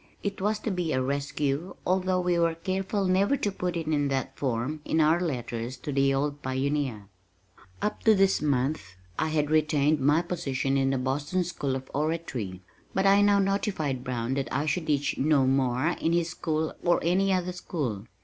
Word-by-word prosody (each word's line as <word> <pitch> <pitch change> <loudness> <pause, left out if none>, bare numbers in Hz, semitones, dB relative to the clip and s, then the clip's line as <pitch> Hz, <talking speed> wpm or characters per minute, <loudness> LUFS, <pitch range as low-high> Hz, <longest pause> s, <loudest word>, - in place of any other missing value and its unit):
It 200 -1 -3
was 210 +2 +1
to 220 - -2
be 180 -4 -1
a 130 - +1
rescue 140 +4 -2
although 185 0 +1
we 180 -1 +1
were 165 -1 +2
careful 190 +4 -2
never 195 +8 +3
to 205 - -1
put 180 -2 -3
it 165 - -3
in 150 -2 +1
that 135 -1 -2
form 135 +3 -2
in 160 - 0
our 160 +3 +4
letters 120 -5 -3
to 135 +4 -5
the 135 0 +3
old 145 +1 -1
pioneer. 130 -5 -2 0.8
Up 210 - -1
to 220 -1 +7
this 195 0 +3
month 135 - -1 0.2
I 155 - +1
had 150 -1 0
retained 150 -1 +3
my 145 +5 +3
position 140 -6 -1
in 135 -1 +2
the 135 - +1
Boston 145 +8 -1
School 145 -6 -2
of 130 0 -6
Oratory, 135 - -3 0.3
but 190 - +2
I 200 +1 +6
now 205 0 +5
notified 190 - 0
Brown 125 -1 -2
that 135 0 -2
I 140 +3 0
should 155 +2 -1
teach 145 -2 0
no 140 -1 +3
more 130 +2 +2
in 165 - +1
his 170 -1 +1
school 160 -2 -2
or 175 0 +3
any 190 +4 +2
other 180 -1 0
school. 130 - -4
150 Hz, 190 wpm, -27 LUFS, 135-180 Hz, 0.8 s, to